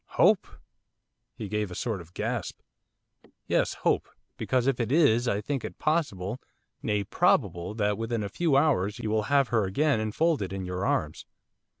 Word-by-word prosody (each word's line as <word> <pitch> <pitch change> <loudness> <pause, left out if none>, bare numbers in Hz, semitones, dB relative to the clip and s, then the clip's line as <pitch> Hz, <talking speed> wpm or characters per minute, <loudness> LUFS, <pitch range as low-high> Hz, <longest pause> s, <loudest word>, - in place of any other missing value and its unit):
'Hope!' - - +4 0.9
He 105 - -6
gave 105 0 -2
a 90 - -8
sort 110 -3 -2
of 85 +1 -16
gasp. - - -3 0.9
'Yes, - - +1
hope, - - +2 0.3
because 130 -2 0
if 135 -2 +1
it 120 0 -1
is 130 -6 +4
I 105 -3 0
think 135 +4 -3
it - - -7
possible, 125 - -1 0.4
nay 105 -1 0
probable, 90 0 +1
that 105 -1 0
within 115 -1 -2
a - - -2
few 155 +4 +1
hours 115 -9 +2
you 110 - -3
will 110 -1 0
have 140 -2 +3
her 110 -4 +2
again 140 +7 +1
enfolded 110 - 0
in 95 -1 -4
your 90 +2 -2
arms. 75 -1 -1
110 Hz, 170 wpm, -27 LUFS, 100-135 Hz, 0.9 s, Hope